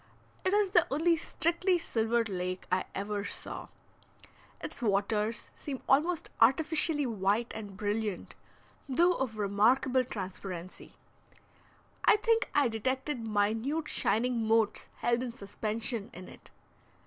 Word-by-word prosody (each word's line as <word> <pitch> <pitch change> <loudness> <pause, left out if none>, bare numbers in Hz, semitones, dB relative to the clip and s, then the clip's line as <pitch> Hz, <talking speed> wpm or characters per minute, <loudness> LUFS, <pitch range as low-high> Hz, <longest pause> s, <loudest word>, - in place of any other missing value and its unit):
It 375 - +1
is 410 -2 +2
the 350 -4 +5
only 325 +5 +3
strictly 340 +4 +1
silver 230 -6 0
lake 185 -3 -4
I 185 0 +1
ever 205 +1 -2
saw. - - -6 0.9
Its - - -7
waters 210 +1 0
seem 275 -3 -6
almost 315 +5 +2
artificially 300 +4 +3
white 215 0 0
and 205 -3 -8
brilliant, 210 -1 -2 0.6
though 345 +7 +4
of 255 -8 -3
remarkable 235 +6 +3
transparency. 185 -5 -7 1.1
I - - +7
think 455 +1 +1
I 285 -3 +5
detected 260 +5 -2
minute 225 +9 0
shining 230 0 0
motes 220 -1 +2
held 240 0 +1
in 255 -2 -3
suspension 220 +1 -2
in 185 0 -9
it. - - -15
230 Hz, 120 wpm, -30 LUFS, 205-290 Hz, 1.1 s, I